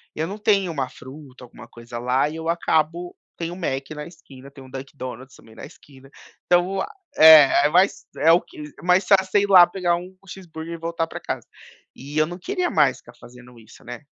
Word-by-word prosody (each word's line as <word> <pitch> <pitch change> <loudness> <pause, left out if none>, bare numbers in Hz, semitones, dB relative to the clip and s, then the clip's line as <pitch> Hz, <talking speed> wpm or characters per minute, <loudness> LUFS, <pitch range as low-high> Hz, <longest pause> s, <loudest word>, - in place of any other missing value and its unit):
eu 160 +1 -3
não 200 +3 -7
tenho 200 -4 +1
uma 135 -5 -3
fruta, 130 -1 -14
alguma 120 - -15
coisa 120 0 -10
lá, 125 +4 0
e 155 - -8
eu 165 0 -5
acabo 170 +1 -1 0.2
tem 170 0 -5
um - - -8
Mac 135 -7 -4
na 150 -1 -7
esquina, 140 -6 -15
tem 140 -1 -15
um 130 - -15
Dunkin 135 +2 -10
Donuts 130 +1 -9
também 110 - -18
na 110 - -12
esquina, 135 -1 -18 0.4
então, 175 0 +3
o - - -1
a - - -4 0.3
é 155 -2 +8
é - - -3
mais 185 +4 +1
é 165 - +4
o 170 - +4
que 360 - -19 0.3
mais 180 +2 +2
fácil 190 -1 +4
você 205 - +4
ir 200 - -1
lá 180 -3 +8
pegar 175 -1 -1
um 180 +2 -9
cheeseburger 170 -3 -9
e - - -6
voltar 165 0 -3
pra - - -8
casa. - - -6 0.5
E 145 +3 -9
eu 155 - +3
não 175 +2 -9
queria 365 - -2
mais 140 -5 +2
ficar - - -17
fazendo 125 0 -16
isso, 110 0 -18
né. 125 +4 -10
155 Hz, 225 wpm, -22 LUFS, 135-175 Hz, 0.5 s, é